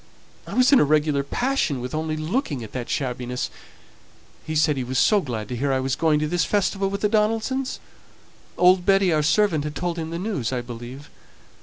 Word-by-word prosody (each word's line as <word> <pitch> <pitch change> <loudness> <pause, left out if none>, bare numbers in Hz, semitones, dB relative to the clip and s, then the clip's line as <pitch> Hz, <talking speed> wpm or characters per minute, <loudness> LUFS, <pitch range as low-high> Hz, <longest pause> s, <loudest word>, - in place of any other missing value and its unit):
I - - -6
was 255 +2 +4
in 275 - +7
a - - +5
regular 150 -1 +2
passion 240 - -1
with 125 +1 -6
only 155 0 -2
looking 155 - -2
at 110 - -9
that 125 -2 -5
shabbiness. 125 -2 -3 0.9
He 155 - -5
said 155 -1 +3
he 130 - -2
was 130 +1 -3
so 210 - +4
glad 115 - -5
to 125 - -3
hear 135 +3 -1
I 130 - +1
was 130 0 -1
going 160 -2 +2
to 155 - 0
this 175 +1 +1
festival 195 +1 0
with 200 0 -4
the 210 - +3
Donaldsons; 225 +5 0 0.8
old 180 0 +5
Betty, 195 -2 +3
our 155 - +2
servant, 155 +1 +2
had 150 0 -5
told 175 -1 -2
him 160 0 -4
the 165 - -4
news, 180 - -2
I 125 -1 -1
believe. 120 +4 -9
155 Hz, 205 wpm, -23 LUFS, 130-195 Hz, 0.9 s, in